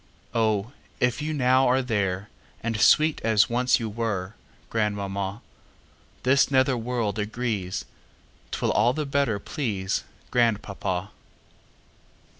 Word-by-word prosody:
Oh, 110 -1 +1 0.3
if 125 +3 +1
you 155 +1 -2
now 130 -2 +3
are 130 +1 +3
there, 100 -4 -1 0.4
And 115 -2 -1
sweet 155 0 +5
as 110 +1 +3
once 125 +2 +3
you 115 - -3
were, 105 -3 -3 0.4
Grandmamma, 100 -1 -2 0.8
This 130 +2 +4
nether 130 -1 +3
world 115 -3 -2
agrees'T 105 -4 -5
will - - +3
all 120 +4 +3
the 150 +2 -2
better 140 -7 +1
pleaseGrandpapa. 100 -4 -2
115 Hz, 105 wpm, -26 LUFS, 100-125 Hz, 0.8 s, sweet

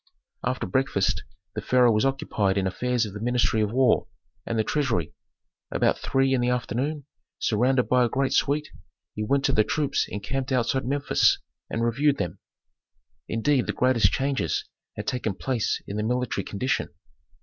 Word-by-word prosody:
After 125 0 -1
breakfast 130 -8 +1 0.3
the 105 - -4
pharaoh 125 +2 +4
was 110 +3 +2
occupied 105 -7 0
in 95 - +1
affairs 120 +5 0
of 105 - -7
the 105 - -6
ministry 120 -2 +1
of 105 -1 0
war, 130 0 +3 0.4
and 115 - -1
the 110 - +2
treasury; 115 - -1 0.6
about - - +1
three 135 0 +1
in 130 - +2
the 120 - +1
afternoon, 130 +5 -2 0.3
surrounded 125 +4 +2
by 125 0 +4
a 120 - +1
great 135 +2 0
suite, 145 +2 +1 0.4
he 105 - -3
went 135 +5 +1
to - - +3
the 110 - +4
troops 145 +4 0
encamped 130 +7 -3
outside 130 +1 +1
Memphis, 140 +1 +3 0.3
and 115 +1 -1
reviewed 140 +5 +2
them. 90 - -3 0.9
Indeed, 125 +3 +1
the - - -1
greatest 120 -7 +3
changes 135 0 -1 0.3
had - - -5
taken 115 -6 -2
place 125 -1 -1
in 100 - -5
the 105 - -1
military 125 +2 -1
condition. 125 +6 -1
125 Hz, 165 wpm, -25 LUFS, 110-135 Hz, 0.9 s, pharaoh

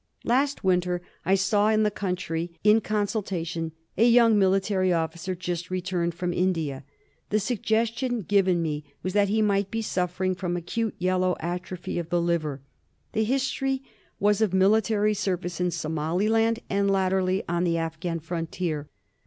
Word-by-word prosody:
Last 275 +4 +1
winter, 180 -1 +1 0.2
I 190 - +4
saw 205 +2 +2
in 215 0 +3
the 210 - +2
country, 175 -4 -3
in 215 +2 +5
consultation, 190 -6 -2 0.2
a 230 +4 +5
young 230 -2 +6
militar}' 190 -2 +2
officer 170 +3 -3
just 175 0 -4
returned 180 -2 -1
from 175 0 -2
India. 165 -7 -1 0.5
The 215 - +2
suggestion 230 +2 0
given 185 -3 +2
me 150 -2 -2 0.2
was 185 - -2
that 205 0 +3
he 215 +1 +2
might 200 -1 +1
be 225 +1 -2
suffering 185 -1 -1
from 180 -1 -2
acute 220 +6 -2
yellow 185 0 +1
atrophy 175 +1 -4
of 170 -1 -5
the 175 - +2
liver. 160 -5 -1 0.5
The 220 0 +1
history 270 +1 0 0.4
was 205 +1 +3
of 200 -4 +2
military 210 +2 +3
service 180 -4 -2
in 180 - +2
Somaliland 190 +9 0
and 200 0 +1
latterly 190 -1 +1
on 175 +1 0
the 170 -2 +1
Afghan 165 +1 -3
Frontier. 165 -2 -3
185 Hz, 150 wpm, -26 LUFS, 175-210 Hz, 0.5 s, young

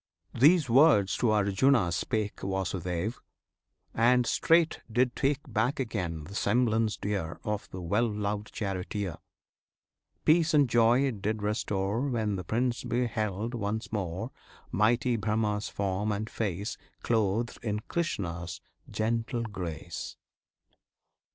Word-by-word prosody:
These 150 +4 +5
words 120 -6 +5
to 120 - +2
Arjuna 105 0 +3
spake 105 +4 -2
Vasudev, 95 +1 -2 0.7
and 120 +2 +4
straight 165 +5 +3
did 120 +2 +2
take 145 0 +1
Back 120 +3 0
again 90 - -3
the 95 - -10
semblance 110 0 +1
dear 95 -5 -3
Of 105 -1 -3
the 95 - -7
well 105 +7 +1
loved 105 0 -3
charioteer; 95 -2 -3 1.1
Peace 160 0 +4
and 145 -2 +5
joy 120 +1 +4
it 130 -8 -1
did 105 +1 -2
restore 105 0 -1
When 110 -5 0
the 90 - -4
Prince 120 +6 -1
beheld 115 -3 -1
once 110 -1 -3
more 95 +3 -3 0.4
Mighty 120 +4 +2
BRAHMA's 105 0 0
form 100 +1 -1
and 105 +1 -2
face 100 -1 -3 0.2
Clothed 115 +1 0
in 105 -2 -2
Krishna's 90 - -3 0.3
gentle 115 +2 -1
grace. 85 -6 -6
110 Hz, 120 wpm, -29 LUFS, 100-120 Hz, 1.1 s, These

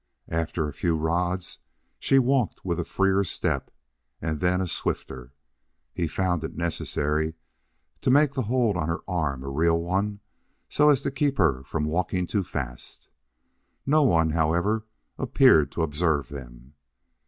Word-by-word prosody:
After 80 -1 -1
a 75 - -6
few 85 -3 0
rods 90 +3 -1 0.4
she 135 - +3
walked 130 -5 +1
with 85 -2 -1
a - - 0
freer 95 +3 +2
step 95 - -1 0.5
and 80 -2 -3
then 90 0 +2
a 95 - 0
swifter. 65 -6 -4 0.6
He 85 - -1
found 90 -1 -1
it 80 - -5
necessary 80 -2 -1 0.7
to - - +1
make 145 +1 +5
that 130 -4 -2
hold 115 -4 +1
on 75 -3 -1
her 85 - -2
arm 75 -8 -1
a - - -7
real 80 +4 +2
one, 100 +4 -1 0.5
so 150 0 +4
as 140 -2 +3
to - - -1
keep 140 0 0
her 75 -9 +2
from 75 +3 -3
walking 90 +3 0
too 100 +2 -1
fast. 65 -8 -6 0.8
No 155 +3 +4
one, 85 - +3
however, 85 +8 +1 0.3
appeared 130 - +4
to 85 - -1
observe 75 -3 0
them. 65 -1 -10
85 Hz, 155 wpm, -26 LUFS, 75-100 Hz, 0.8 s, make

